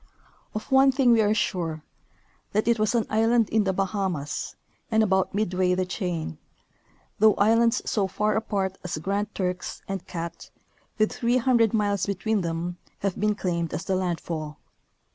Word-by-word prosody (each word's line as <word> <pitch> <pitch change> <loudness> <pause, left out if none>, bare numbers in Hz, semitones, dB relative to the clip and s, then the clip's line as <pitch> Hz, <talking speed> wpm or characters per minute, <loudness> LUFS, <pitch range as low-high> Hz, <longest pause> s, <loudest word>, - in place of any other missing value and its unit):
Of 215 +5 -5
one 270 0 +6
thing 260 -2 +3
we 230 -1 +5
are 210 0 +3
sure, 165 -7 -1 0.7
that 215 +2 +1
it 235 -1 +3
was 215 +2 +1
an 230 -3 +2
island 225 +1 +2
in 220 -1 +2
the 190 - +2
Baha 195 +1 -1
mas 150 -4 -4 0.3
and 220 -1 +3
about 190 -1 +1
midway 185 -3 +1
the 185 0 0
chain, 175 - -4 0.8
though 215 0 +6
islands 230 +3 +3
so 200 -3 0
far 210 +3 0
apart 195 -4 -1
as 180 -3 -3
Grand 200 +6 -2
Turks 180 -1 -3
and 195 -2 -5
Cat, 170 -1 -6 0.5
with 215 0 +2
300 235 -2 +2
miles 205 -3 +1
between 205 +2 0
them, 170 +1 -3 0.2
have 195 -2 -2
been 210 +1 +2
claimed 170 -5 -2
as 170 +5 -5
the 190 - 0
landfall. 165 -4 -3
200 Hz, 160 wpm, -26 LUFS, 180-220 Hz, 0.8 s, one